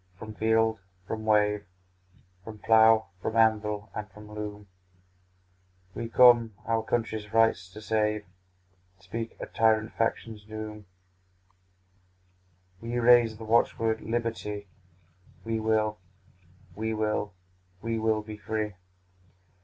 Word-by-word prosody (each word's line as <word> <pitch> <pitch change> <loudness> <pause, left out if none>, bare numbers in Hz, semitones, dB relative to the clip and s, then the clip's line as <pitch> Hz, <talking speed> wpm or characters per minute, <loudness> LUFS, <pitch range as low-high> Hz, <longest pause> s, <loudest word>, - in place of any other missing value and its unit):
from 110 +2 -8
field, 110 0 +2 0.3
from 110 +3 -5
wave, 105 -1 +3 0.8
From 110 +2 -9
plough, 110 0 +5
from 110 - -3
anvil, 105 -2 +2
and 105 0 -6
from 105 +2 -13
loom; 105 -1 -6 1.3
We 115 +4 -5
come, 120 -3 +6
our 115 0 +1
country's 110 -2 -2
rights 110 -5 +3
to 105 +3 -11
save, 105 -1 0 0.7
And 100 - -28
speak 115 +5 -6
a - - -4
tyrant 110 -1 +1
faction's 115 -1 -2
doom: 110 -1 -8 1.9
We 115 +1 -3
raise 120 -2 +5
the 115 - -9
watch 115 +2 +2
word 110 -1 0
liberty; 115 -3 -3 0.8
We 115 0 -1
will, 110 -1 0 0.7
we 110 +1 -3
will, 105 -2 -1 0.5
we 115 -1 -1
will 110 -1 +1
be 105 0 -8
free! 105 0 -3
110 Hz, 115 wpm, -28 LUFS, 105-115 Hz, 1.9 s, come